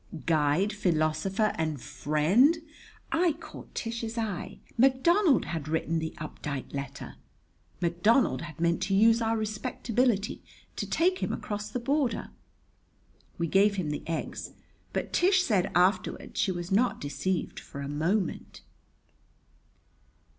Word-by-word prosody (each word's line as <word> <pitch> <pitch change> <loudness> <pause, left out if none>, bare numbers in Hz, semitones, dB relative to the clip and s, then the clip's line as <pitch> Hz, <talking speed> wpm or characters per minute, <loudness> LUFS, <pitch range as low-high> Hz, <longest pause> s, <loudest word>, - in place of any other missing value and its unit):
"Guide, 160 +5 +2
philosopher, 185 +3 +1
and 155 -3 -1
friend!" 155 - +3 0.5
I 330 0 +3
caught 315 - -12
Tish's 230 0 -4
eye. 215 -6 -3 0.2
McDonald 270 - +4
had 160 -3 -4
written 160 +1 0
the 160 0 -4
Updike 150 -3 -6
letter! 140 0 -6 0.7
McDonald 175 - +3
had 165 -3 -9
meant 170 +1 +1
to 195 +1 +1
use 225 +3 +5
our 225 0 +1
respectability 220 0 -1 0.3
to - - -4
take 365 +3 +2
him - - -1
across 205 0 -4
the 250 - -3
border! 270 0 0 1.1
We 170 - 0
gave 200 +4 +4
him 170 -6 -2
the 150 - -3
eggs, 165 -1 -4 0.4
but - - -3
Tish 370 +1 +4
said 195 - +1
afterward 180 +3 +1
she 200 - +1
was 175 0 -5
not 230 +6 +2
deceived 170 +5 -2
for 140 - -9
a 140 - -4
moment. 165 +6 -1
195 Hz, 125 wpm, -28 LUFS, 160-230 Hz, 1.1 s, use